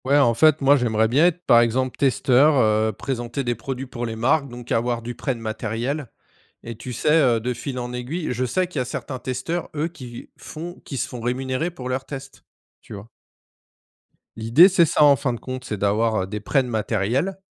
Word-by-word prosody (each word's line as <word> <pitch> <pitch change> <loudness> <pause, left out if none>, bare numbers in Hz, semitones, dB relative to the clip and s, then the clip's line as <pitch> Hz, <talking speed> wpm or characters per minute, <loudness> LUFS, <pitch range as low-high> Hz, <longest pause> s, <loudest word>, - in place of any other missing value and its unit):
Ouais 140 +2 +3
en 120 -5 +4
fait, 155 +6 +4
moi 140 +1 +5
j'aimerais 110 -3 +1
bien 145 +9 +4
être 180 0 -3
par 120 - +6
exemple 125 +2 0
testeur, 135 +2 +3
heu, 110 -2 +3
présenter 120 +4 -4
des 120 -1 0
produits 125 +3 -5
pour 120 -2 -5
les 115 - -5
marques, 140 +5 +1
donc 120 0 -10
avoir 120 0 0
du 120 +1 -5
prêt 135 +1 -3
de - - -10
matériel 115 +5 -3 0.6
et 115 0 -7
tu 125 +3 -8
sais, 135 - -1
heu, 130 -8 +4
de 125 +3 -2
fil 125 +2 -6
en 120 0 -4
aiguille 140 +8 -4
je 125 +1 -2
sais 185 +10 0
qu'il 175 -6 -5
y - - +1
a - - -2
certains 130 +1 -5
testeurs, 130 +8 -4
eux, 150 +2 0
qui 125 -8 -10
font 170 +3 -8
qui 135 - -6
se - - -1
font 125 - -8
rémunérer 130 +6 -2
pour 130 -7 -8
leurs 130 +1 -2
tests, 135 -1 -9 0.4
tu - - -12
vois? 100 +3 -11 1.3
L'idée 115 - +6
c'est 180 -3 +4
ça 150 - +2
en 145 -1 +7
fin 125 +1 -1
de 120 - -6
compte, 130 0 -6
c'est 105 - -4
d'avoir, 105 +1 +1
heu, - - -6
des 105 +2 -5
prêts 135 +6 +1
de 125 - -7
matériel, 115 - -1
125 Hz, 220 wpm, -22 LUFS, 115-140 Hz, 1.3 s, en